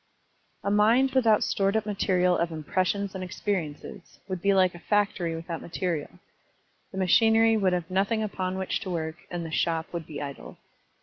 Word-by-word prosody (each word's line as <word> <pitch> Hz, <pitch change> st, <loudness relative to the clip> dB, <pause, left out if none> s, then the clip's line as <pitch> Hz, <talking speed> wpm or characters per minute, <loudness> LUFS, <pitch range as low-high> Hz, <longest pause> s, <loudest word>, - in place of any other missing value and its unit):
A 200 Hz, -, 0 dB
mind 230 Hz, +6 st, +4 dB
without 230 Hz, -5 st, +4 dB
stored 195 Hz, +2 st, +1 dB
up 220 Hz, -, -1 dB
material 185 Hz, -3 st, +2 dB
of 170 Hz, 0 st, 0 dB
impressions 185 Hz, +5 st, -1 dB
and 190 Hz, -1 st, -5 dB
experiences 180 Hz, -4 st, -4 dB
would 185 Hz, -3 st, -4 dB
be 200 Hz, -, +3 dB
like 185 Hz, -2 st, +4 dB
a 175 Hz, -, -10 dB
factory 195 Hz, -4 st, 0 dB
without 165 Hz, 0 st, -5 dB
material. 170 Hz, -3 st, -3 dB, 0.8 s
The 190 Hz, -, -8 dB
machinery 225 Hz, +4 st, +4 dB
would 195 Hz, -4 st, +2 dB
have 175 Hz, -2 st, -1 dB
nothing 200 Hz, +4 st, +1 dB
upon 190 Hz, -3 st, -3 dB
which 190 Hz, -1 st, -1 dB
to 200 Hz, -, -6 dB
work, 160 Hz, -2 st, -3 dB
and 175 Hz, -1 st, -4 dB
the 160 Hz, -, -6 dB
shop 165 Hz, +1 st, -1 dB
would 170 Hz, -2 st, -5 dB
be 150 Hz, -3 st, -6 dB
idle. 140 Hz, -1 st, -7 dB
185 Hz, 175 wpm, -27 LUFS, 170-205 Hz, 0.8 s, mind